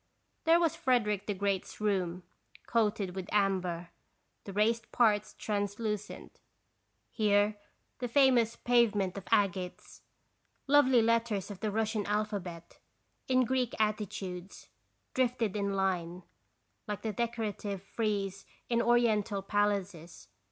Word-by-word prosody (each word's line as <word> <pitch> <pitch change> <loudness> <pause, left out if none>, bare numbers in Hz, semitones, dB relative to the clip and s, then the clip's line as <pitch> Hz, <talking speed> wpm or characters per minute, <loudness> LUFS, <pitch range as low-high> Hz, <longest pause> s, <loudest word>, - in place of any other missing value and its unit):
There 330 +1 +6
was 330 -2 +2
Frederick 240 - +1
the 205 - -1
Great's 195 -1 -2
room, 185 -4 -1 0.4
coated 210 -5 0
with 190 0 -5
amber, 185 -4 0 0.5
the 200 - -6
raised 220 +3 +1
parts 215 -3 +2
translucent; 210 0 -3 0.7
here 205 -1 +2 0.4
the 245 - -2
famous 245 -3 +4
pavement 215 -6 +2
of 195 -2 -7
agates. 195 -4 0 0.6
Lovely 265 -4 +5
letters 225 -4 +1
of 195 - -8
the 215 - -1
Russian 215 0 -1
alphabet, 200 -5 -3 0.5
in 255 -1 +3
Greek 250 -1 0
attitudes, 200 -4 -3 0.4
drifted 245 -5 0
in 200 -1 -1
line, 180 -2 -1 0.6
like 210 -1 -4
the 220 -2 -2
decorative 210 -4 -3
frieze 200 -2 -2 0.3
in 235 -1 +2
Oriental 220 -4 +2
palaces. 195 - -2
210 Hz, 110 wpm, -31 LUFS, 195-230 Hz, 0.7 s, There